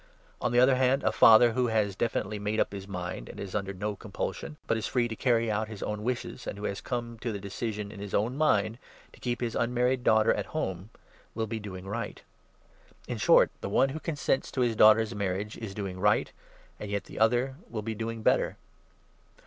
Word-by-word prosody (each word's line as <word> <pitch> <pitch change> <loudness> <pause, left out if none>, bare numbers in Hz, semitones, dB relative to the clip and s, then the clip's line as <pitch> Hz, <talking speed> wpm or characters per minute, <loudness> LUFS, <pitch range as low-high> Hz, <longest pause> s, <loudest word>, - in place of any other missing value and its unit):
On - - 0
the 120 - +4
other 130 +1 +5
hand, 130 +2 +2
a 110 - +2
37 - - -11
father, 115 +1 +8
who 125 +2 +1
has 105 -4 +1
definitely 105 -1 -1
made 105 +2 -1
up - - +1
his 100 -1 -7
mind, 90 -8 -5
and - - -9
is 95 -2 -6
under 100 -1 -2
no 100 +2 -3
compulsion, 75 -6 -5
but - - +1
is 110 -3 -2
free 120 -2 +1
to 115 - -5
carry 115 -2 +2
out 110 +1 -1
his 105 -2 -7
own 105 0 -3
wishes, 125 +2 -4
and - - -4
who 100 - -8
has 100 -1 -3
come 120 -2 -4
to 120 - -3
the 105 - -3
decision, 105 +1 -4
in 105 - -10
his 100 -1 -4
own 115 +5 +1
mind, 115 -6 +2 0.3
to - - -17
keep 120 -1 -2
his 120 -2 -2
un 120 +1 0
married 125 +1 +2
daughter 110 -2 +4
at - - -3
home, 95 - -3 0.5
will 110 0 -1
be 110 +1 -4
doing 95 -3 -8
right. 115 +4 -5 0.8
In - - -4
short, - - +5
the - - -3
38 - - -4
one 135 - +4
who 150 +4 -5
consents 145 -4 -1
to 130 - -2
his 120 -2 +2
daughter's 110 +1 +6
marriage 100 +1 -2
is 105 -4 -6
doing 95 -3 -4
right, 105 +2 +2 0.5
and 105 - -6
yet 100 0 -2
the - - -9
other 120 +4 +2
will 110 -2 -4
be 110 +1 -3
doing 115 +1 -4
better. - - +2
110 Hz, 225 wpm, -29 LUFS, 100-120 Hz, 0.8 s, father